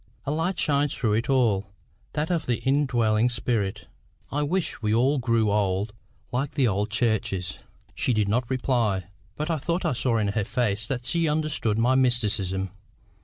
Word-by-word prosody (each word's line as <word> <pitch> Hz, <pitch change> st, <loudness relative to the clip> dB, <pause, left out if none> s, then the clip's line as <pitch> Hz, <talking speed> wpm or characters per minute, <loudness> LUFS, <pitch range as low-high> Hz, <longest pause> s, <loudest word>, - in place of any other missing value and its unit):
A 140 Hz, -, -1 dB
light 165 Hz, +5 st, -1 dB
shines 145 Hz, -1 st, +2 dB
through 110 Hz, -5 st, 0 dB
it 115 Hz, +5 st, 0 dB
all 110 Hz, -7 st, +2 dB, 0.5 s
that 155 Hz, +3 st, -1 dB
of 170 Hz, -2 st, -1 dB
the 120 Hz, -2 st, +1 dB
indwelling 125 Hz, -5 st, +2 dB
spirit. 110 Hz, -4 st, -1 dB, 0.5 s
I 145 Hz, -, 0 dB
wish 170 Hz, +2 st, -1 dB
we 105 Hz, -1 st, 0 dB
all 135 Hz, +5 st, +3 dB
grew 115 Hz, -4 st, +2 dB
old 100 Hz, 0 st, 0 dB, 0.4 s
like 130 Hz, +3 st, -1 dB
the 140 Hz, -4 st, +2 dB
old 105 Hz, +1 st, 0 dB
churches." 110 Hz, -5 st, -1 dB, 0.3 s
She -, -, 0 dB
did 105 Hz, -3 st, +2 dB
not 115 Hz, +3 st, 0 dB
reply, 115 Hz, -8 st, 0 dB, 0.2 s
but 155 Hz, +3 st, -2 dB
I 160 Hz, -, 0 dB
thought 170 Hz, +6 st, -1 dB
I 160 Hz, -, +2 dB
saw 120 Hz, -1 st, +1 dB
in 105 Hz, -2 st, +1 dB
her 105 Hz, +1 st, 0 dB
face 110 Hz, -1 st, -1 dB
that 125 Hz, -3 st, -3 dB
she 165 Hz, +1 st, +1 dB
understood 150 Hz, -8 st, 0 dB
my 120 Hz, +3 st, +3 dB
mysticism. 105 Hz, -7 st, +1 dB
120 Hz, 170 wpm, -26 LUFS, 105-140 Hz, 0.5 s, all